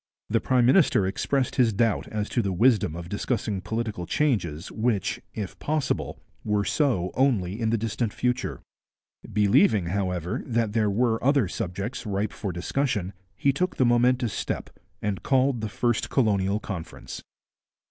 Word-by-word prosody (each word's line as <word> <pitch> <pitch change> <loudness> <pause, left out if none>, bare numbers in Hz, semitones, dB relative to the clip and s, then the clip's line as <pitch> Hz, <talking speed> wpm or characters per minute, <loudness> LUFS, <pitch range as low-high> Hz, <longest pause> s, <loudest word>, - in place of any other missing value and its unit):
The - - +2
prime 125 -2 +3
minister 130 - +4
expressed 130 +7 -1
his 120 -4 +4
doubt 115 +1 +1
as 105 -1 -3
to 120 - +1
the 100 -3 -1
wisdom 105 -4 +3
of 85 0 -6
discussing 100 0 -2
political 110 -5 -3
changes 95 - 0
which, 110 -3 -1
if 100 -4 -5
possible, 150 -2 -1 0.2
were 105 -1 0
so 120 - +1
only 115 -6 +1
in 110 - +1
the 115 - +2
distant 110 0 -2
future. 125 +3 -2 0.7
Believing, 105 - +3
however, 90 -3 -1
that 115 -3 0
there 110 -2 +2
were 115 +2 +1
other 140 -5 +3
subjects 95 +5 -4
ripe 100 +1 -1
for 100 - -4
discussion, 100 +1 -1 0.2
he 140 - +2
took 180 +6 -1
the 130 - +4
momentous 120 -1 +3
step, - - -3 0.3
and 105 -3 -1
called 130 -3 +2
the 110 - -3
first 120 +4 0
Colonial 100 -5 +2
Conference. 95 -7 -7
110 Hz, 150 wpm, -26 LUFS, 100-125 Hz, 0.7 s, minister